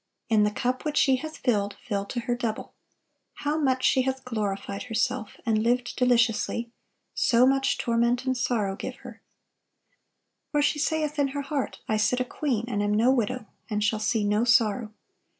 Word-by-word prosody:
"In 220 -2 +4
the 210 - +3
cup 250 +4 -2
which 300 -2 -2
she 265 -2 +4
hath 315 +3 -7
filled, 205 -5 0
fill 200 -2 -1
to 240 +4 -4
her 245 0 -1
double. 235 -2 -4 0.6
How 295 +2 -1
much 260 -3 +1
she 260 - +4
hath 260 0 -2
glorified 200 -4 -3
herself, 230 0 -1
and 220 -2 +2
lived 245 +2 0
deliciously, 235 -1 +1 0.4
so 240 +1 +4
much 270 +1 +2
torment 235 +1 +1
and 260 0 +1
sorrow 215 -5 0
give 255 - -6
her: 235 -2 -10 1.3
for 295 -1 +2
she 300 +1 +1
saith 305 -1 -1
in 285 - +3
her 285 - -2
heart, 280 -1 -3
I 215 - +1
sit 215 +4 +2
a 255 - 0
queen, 245 -4 -2
and 205 -4 -1
am 205 0 +1
no 235 +4 +4
widow, 250 -1 -1 0.2
and 210 -1 -1
shall 215 +1 +1
see 215 0 0
no 210 +2 +2
sorrow. 230 -2 +2
240 Hz, 180 wpm, -26 LUFS, 215-260 Hz, 1.3 s, In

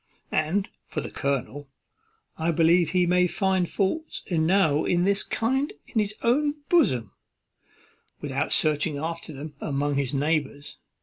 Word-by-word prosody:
And 170 +6 0 0.2
for - - -4
the - - -6
colonel, 140 +1 -3 0.7
I 160 +1 -1
believe 170 +1 +4
he 180 +1 +2
may 180 +1 +3
find 190 -1 0
faults 315 +12 -1
enow 160 -2 +2
of 175 0 +2
this 200 +1 +2
kind 265 - -1
in 225 - -2
his 210 0 -1
own 290 +5 +2
bosom, 130 - +2 1.1
without - - -2
searching 150 0 +2
after 165 +2 -4
them 150 +1 -8
among 145 0 -1
his 135 -3 0
neighbours. 145 0 -2
165 Hz, 135 wpm, -25 LUFS, 145-195 Hz, 1.1 s, believe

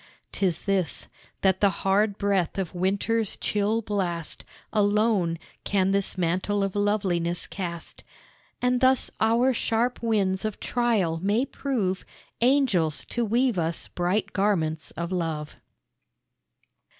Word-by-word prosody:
'Tis 185 -5 0
this 195 -4 -1 0.3
that 190 -1 +2
the 200 - +6
hard 195 +2 +1
breath 200 -4 0
of 190 -3 -2
winter's 200 +4 0
chill 210 +2 0
blast 180 -6 -3 0.3
Alone 205 -4 +2 0.3
can 195 -1 +1
this 195 -1 +1
mantle 185 +4 0
of 195 0 -2
loveliness 190 -5 +1
cast; 170 -3 -6 0.6
And 250 0 +2
thus 260 0 +3
our 235 +4 +4
sharp 235 +1 0
winds 195 -5 +1
of 215 -2 -3
trial 215 -10 +1
may 210 +7 +2
prove 215 -11 -2 0.4
Angels 235 - +2
to 240 - -1
weave 235 -1 +2
us 165 0 -2
bright 180 +4 -1
garments 165 -6 0
of 170 +1 -3
love. 160 -4 -3
200 Hz, 120 wpm, -26 LUFS, 180-220 Hz, 0.6 s, the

